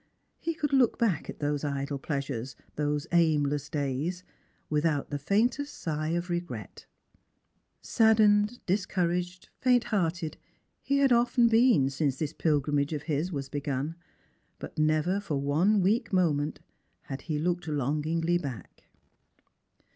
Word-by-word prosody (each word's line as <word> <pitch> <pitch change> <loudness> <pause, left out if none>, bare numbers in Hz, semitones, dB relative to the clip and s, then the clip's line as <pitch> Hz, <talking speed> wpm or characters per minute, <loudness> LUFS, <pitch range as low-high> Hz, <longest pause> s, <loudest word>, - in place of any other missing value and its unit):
He 330 0 -3
could 295 -3 -2
look 260 -4 +4
back 210 -10 0
at - - -6
those 145 0 -1
idle 140 -1 -2
pleasures, 135 -4 -4 0.2
those 150 0 -1
aimless 150 -4 +2
days, 150 +4 -2 0.4
without 150 -1 0
the 145 - -2
faintest 240 - 0
sigh 155 -1 -3
of 170 +2 -1
regret. 175 - -5 1.0
Sad 220 -1 +4
dened, 210 +2 +4
discouraged, 180 -2 -1
fainthearted, 195 -10 +1 0.4
he 280 - +1
had 275 -2 +4
often 240 0 +4
been 225 - +4
since 135 -1 -1
this 155 +1 -3
pilgrimage 145 -2 +1
of 150 -1 -4
his 155 +3 -1
was 140 -4 -4
begun; 145 +1 -3 0.6
but - - -8
never 155 +5 +2
for 195 -8 -3
one 165 +9 +2
weak 220 +3 +1
moment 155 -5 +1 0.4
had 135 - -6
he 155 - 0
looked 175 +2 -1
longingly 155 +4 0
back. 130 - -8
160 Hz, 130 wpm, -28 LUFS, 145-195 Hz, 1.0 s, look